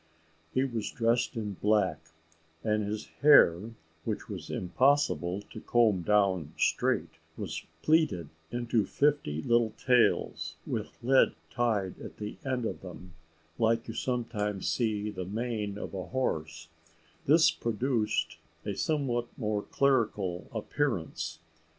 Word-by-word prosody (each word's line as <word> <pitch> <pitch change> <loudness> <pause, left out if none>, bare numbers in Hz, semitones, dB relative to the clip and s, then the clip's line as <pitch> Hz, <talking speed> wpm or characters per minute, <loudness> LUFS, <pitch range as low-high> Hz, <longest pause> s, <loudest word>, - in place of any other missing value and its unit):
He 130 - +2
was 120 -5 -2
dressed 120 +3 +1
in 105 -3 -3
black, 100 -7 +2 0.6
and 105 -1 +1
his 105 +1 -3 0.2
hair, 110 - +6 0.3
which - - -2
it - - -16
was - - -6
impossible 100 -4 +1
to - - -8
comb 110 -6 +3
down 95 -5 +2
straight, - - +1 0.2
was - - -5 0.2
plaited 155 - +2 0.2
into 115 -3 0
fifty 140 - +1
little 115 -2 +2
tails, 125 -2 +2
with - - -4
lead 130 +2 +4 0.2
tied 110 -6 0
at - - -9
the 105 0 -6
end 130 -4 -1
of - - -4
them, 90 0 -10 0.5
like 115 0 +2
you 115 - -5
sometimes 110 -6 -2
see 105 -3 0
the 95 -2 -5
mane 105 0 -3
of - - -6
a 95 -2 -5
horse: 80 -11 -2 0.6
this 160 +3 +6
produced 110 - -1 0.3
a 105 - -2
somewhat 125 - 0
more 105 -3 -1
clerical 105 -10 0
appearance. 105 - -2
110 Hz, 125 wpm, -30 LUFS, 95-120 Hz, 0.6 s, hair